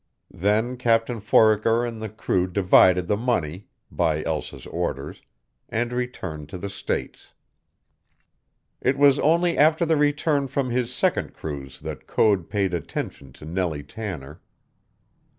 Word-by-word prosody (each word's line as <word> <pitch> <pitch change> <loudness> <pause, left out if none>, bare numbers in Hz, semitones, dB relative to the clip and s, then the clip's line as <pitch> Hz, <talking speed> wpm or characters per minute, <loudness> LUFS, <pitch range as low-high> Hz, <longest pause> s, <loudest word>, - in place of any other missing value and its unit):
Then 110 +7 0
Captain 115 -1 +1
Foraker 110 +2 +3
and 115 -2 -6
the 110 - -4
crew 95 -3 0
divided 90 -1 +4
the 105 - +2
money 100 -6 -2 0.2
(by 80 -3 0
Elsa's 80 -2 -4
orders), 70 +2 -4 0.5
and 120 +2 -1
returned 95 -12 -4
to 90 - -6
the 100 +2 -6
States. - - -5 1.5
It 130 +2 +1
was 140 0 +5
only 170 +3 +3
after 160 +3 +4
the 160 -1 +2
return 145 -1 +1
from 130 -1 -2
his 125 0 -1
second 125 - 0
cruise 70 -4 -7
that - - -7
Code 100 -6 +2
paid 100 -3 0
attention 70 -4 -5
to - - -13
Nellie 80 -3 -2
Tanner. 75 -5 -7
105 Hz, 135 wpm, -24 LUFS, 85-125 Hz, 1.5 s, was